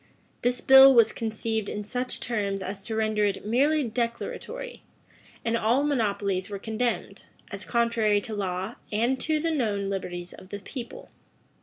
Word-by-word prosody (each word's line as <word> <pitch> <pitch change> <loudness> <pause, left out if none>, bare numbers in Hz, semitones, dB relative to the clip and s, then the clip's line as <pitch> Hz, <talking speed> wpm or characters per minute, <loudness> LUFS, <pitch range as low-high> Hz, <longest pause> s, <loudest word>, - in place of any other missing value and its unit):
This 245 +1 0
bill 265 0 +9
was 230 -2 +6
conceived 220 -1 -3
in 210 - -4
such 250 +4 -3
terms 200 -4 -2
as 195 +2 -5
to 225 - -3
render 215 -1 +1
it 200 -1 -1
merely 285 +7 +2
declaratory; 250 - -4 0.6
and 230 0 +1
all 230 +5 +2
monopolies 205 -8 0
were 200 - -4
condemned, 225 +4 -3 0.3
as - - -6
contrary 230 -3 +2
to 220 - -6
law 190 +1 -3
and 235 +5 +1
to 310 -1 +1
the 330 +2 0
known 205 -9 -1
liberties 175 -2 -5
of 185 - -13
the 205 - -5
people. 240 +5 -8
220 Hz, 155 wpm, -27 LUFS, 205-250 Hz, 0.6 s, bill